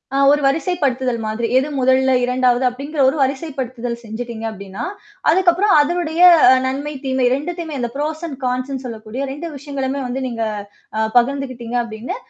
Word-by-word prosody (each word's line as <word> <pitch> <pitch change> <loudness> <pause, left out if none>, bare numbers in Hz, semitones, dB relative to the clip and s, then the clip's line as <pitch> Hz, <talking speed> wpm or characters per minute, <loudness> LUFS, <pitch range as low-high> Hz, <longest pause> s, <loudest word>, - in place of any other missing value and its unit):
ஆ - - +2
ஒரு 295 - +3
வரிசைப்படுத்துதல் 275 -5 0
மாதிரி. 220 +2 -2
எது 270 +3 +1
1ல 260 +1 +3
2 250 0 +2
அப்படிங்கிற 280 +5 -5
ஒரு 265 - +2
வரிசைப்படுத்துதல் 260 -4 -2
செஞ்சுட்டீங்க 225 0 -6
அப்ப்டின்னா, 200 +1 -7 0.5
அதுக்கப்புறம் 370 +3 +4
அதனடைய 335 +2 0 0.4
நன்மை 280 +3 -3
தீமை 260 -1 +1
2த்தையுமே 320 0 -5
இந்த 240 - -1
ப்ரோசன் 310 +1 -3
கான்ஸ்ன்னு 255 +2 -2
சொல்லக்கூடிய 230 +2 -5 0.3
விஷயங்களுமே 275 -1 -3
வந்து 250 +2 -3
நீங்க 230 -2 -3 0.5
அ - - 0 0.2
பகிர்ந்துக்கிட்டீங்க 250 -2 0
அப்படின்னு, 230 - -6
265 Hz, 130 wpm, -19 LUFS, 240-290 Hz, 0.5 s, அதுக்கப்புறம்